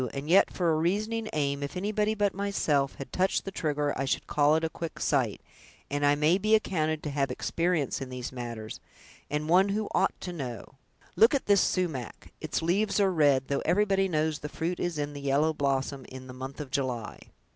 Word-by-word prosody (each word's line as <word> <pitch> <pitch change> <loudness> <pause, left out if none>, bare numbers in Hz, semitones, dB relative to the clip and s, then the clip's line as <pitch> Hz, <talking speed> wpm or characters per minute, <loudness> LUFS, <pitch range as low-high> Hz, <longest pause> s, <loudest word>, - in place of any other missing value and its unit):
and 140 +2 -4
yet 195 - +6
for 175 -3 +1
a - - +1
reasoning 215 +7 -1
aim, 140 -2 0
if 140 +5 -4
anybody 210 +2 0
but 205 -2 +1
myself 160 -8 0
had 135 - -9
touched 190 +1 +1
the 195 - -4
trigger, 150 -4 -1
I 135 - -1
should 135 - -1
call 150 +1 +3
it 160 - 0
a - - +2
quick 165 -2 -6
sight; 130 -8 +1 0.5
and 145 0 -1
I 145 0 +5
may 155 +6 +3
be 215 +2 +4
accounted 155 -7 0
to 150 - -3
have 140 -2 0
experience 165 +2 -1
in 130 - -5
these 125 -1 -5
matters, 115 -3 -6 0.5
and 150 +1 -2
one 185 +4 +5
who 210 +1 -1
ought - - +1
to 180 - -5
know. 130 -8 -6 0.4
Look 230 +6 +6
at 275 - -1
this 200 -2 +5
sumach; 160 - -2
its - - -2
leaves 200 +5 +1
are 195 -2 +3
red, 145 -5 +3
though 140 - -1
everybody 195 +2 +2
knows 155 -3 0
the 150 - -6
fruit 170 +4 -3
is 175 -3 -2
in 145 0 -3
the 145 - -7
yellow 140 +3 +2
blossom 135 -1 -1
in 130 0 -9
the 130 - -9
month 130 +1 -7
of 145 -3 -6
July!" 125 -5 -2
155 Hz, 210 wpm, -28 LUFS, 140-185 Hz, 0.5 s, yet